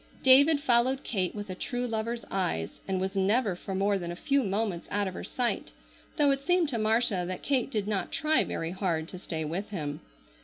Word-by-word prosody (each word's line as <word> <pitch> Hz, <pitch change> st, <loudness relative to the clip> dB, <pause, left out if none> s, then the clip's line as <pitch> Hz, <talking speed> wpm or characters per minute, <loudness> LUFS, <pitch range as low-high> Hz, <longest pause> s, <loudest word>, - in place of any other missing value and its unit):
David 285 Hz, +4 st, +7 dB
followed 260 Hz, 0 st, +3 dB
Kate 190 Hz, -4 st, -1 dB
with 205 Hz, -2 st, -5 dB
a -, -, -2 dB
true 245 Hz, +6 st, -3 dB
lover's 230 Hz, 0 st, -3 dB
eyes 130 Hz, -, -2 dB
and 190 Hz, -1 st, 0 dB
was 190 Hz, +1 st, -2 dB
never 200 Hz, +1 st, +2 dB
for 190 Hz, +2 st, -6 dB
more 200 Hz, +1 st, +1 dB
than 175 Hz, -1 st, -4 dB
a -, -, -5 dB
few 280 Hz, +8 st, +1 dB
moments 200 Hz, -4 st, -1 dB
out 205 Hz, -1 st, 0 dB
of 190 Hz, -, -4 dB
her -, -, -6 dB
sight, 240 Hz, -, -2 dB, 0.4 s
though 290 Hz, -1 st, +4 dB
it 275 Hz, 0 st, 0 dB
seemed 355 Hz, -1 st, +2 dB
to 235 Hz, -5 st, -2 dB
Marcia 220 Hz, -3 st, +2 dB
that 185 Hz, 0 st, -5 dB
Kate 265 Hz, -3 st, +1 dB
did 210 Hz, -6 st, -2 dB
not 205 Hz, -3 st, -1 dB
try 310 Hz, 0 st, +2 dB
very 165 Hz, 0 st, -3 dB
hard 175 Hz, -4 st, -1 dB
to 185 Hz, -, -8 dB
stay 160 Hz, -4 st, -4 dB
with 175 Hz, +7 st, -4 dB
him. 150 Hz, -7 st, -4 dB
205 Hz, 215 wpm, -28 LUFS, 185-245 Hz, 0.4 s, David